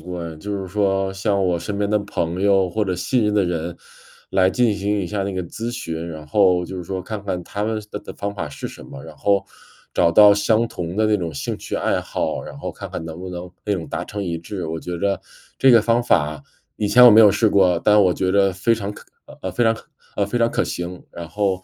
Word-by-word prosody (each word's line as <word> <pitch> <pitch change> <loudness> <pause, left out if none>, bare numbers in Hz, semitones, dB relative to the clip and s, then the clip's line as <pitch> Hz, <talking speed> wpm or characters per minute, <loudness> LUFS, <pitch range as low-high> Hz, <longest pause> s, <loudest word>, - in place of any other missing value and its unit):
过 90 -1 -6
哎， 85 -1 -6
就 100 +4 -4
是 95 - -5
说 95 0 0
向 100 0 0
我 90 -1 +1
身 100 +4 -4
边 100 0 0
的 105 0 +2
朋 90 -3 -3
友 95 -2 +3
或 105 +4 -1
者 95 -2 -1
信 110 +6 +1
任 105 - +1
的 105 -2 +3
人， 85 -1 -3 0.5
来 95 -1 +3
进 120 -2 +2
行 100 +1 -1
一 95 - -3
下 100 +2 -2
那 100 0 -3
个 95 -1 -2
咨 115 +7 -5
询， 85 -9 -5
然 80 -2 -8
后 90 +1 +3
就 95 - -7
是 90 - -5
说 95 +2 -4
看 105 +2 -6
看 90 -3 -3
他 100 +4 -4
们 110 0 -1
的 105 - -4
的 - - -9
方 100 0 -4
法 90 -6 -4
是 - - -7
什 - - -10
么， - - -10
然 - - -11
后 100 -1 +1 0.5
找 85 -1 +4
到 105 +3 +7
相 110 +3 +2
同 90 -4 -6
的 110 0 +3
那 105 0 +3
种 85 -4 -4
兴 70 - -4
趣 - - -5
爱 - - 0
好， - - -3
然 70 - -10
后 - - -5
看 - - -9
看 - - -5
能 80 0 -7
不 95 - -6
能 90 0 -6 0.2
那 105 - 0
种 85 -3 -5
达 - - -3
成 105 0 -5
一 85 -2 -2
致。 90 +3 -6
我 80 0 -4
觉 90 0 -5
着 100 +1 0 0.4
这 135 - +6
个 120 -2 +7
方 115 +2 +2
法 75 -10 +1 0.3
以 105 - -1
前 125 +4 +7
我 120 - +11
没 110 - +8
有 105 -2 +8
试 105 +2 +2
过， 90 -4 +3
但 105 0 +6
我 90 -2 +4
觉 95 0 -1
着 100 -1 +3
非 100 +6 +1
常 100 -2 -4
可 - - -13 0.2
呃， - - -14
呃， 95 - -3
非 120 - 0
常 115 - +4
可 - - -14 0.3
呃， 100 - +1
非 110 +5 -3
常 115 0 +3
可 - - 0
行， 90 0 -5
然 85 -1 -8
后， 95 -1 -1
95 Hz, 285 characters per minute, -21 LUFS, 90-105 Hz, 0.5 s, 我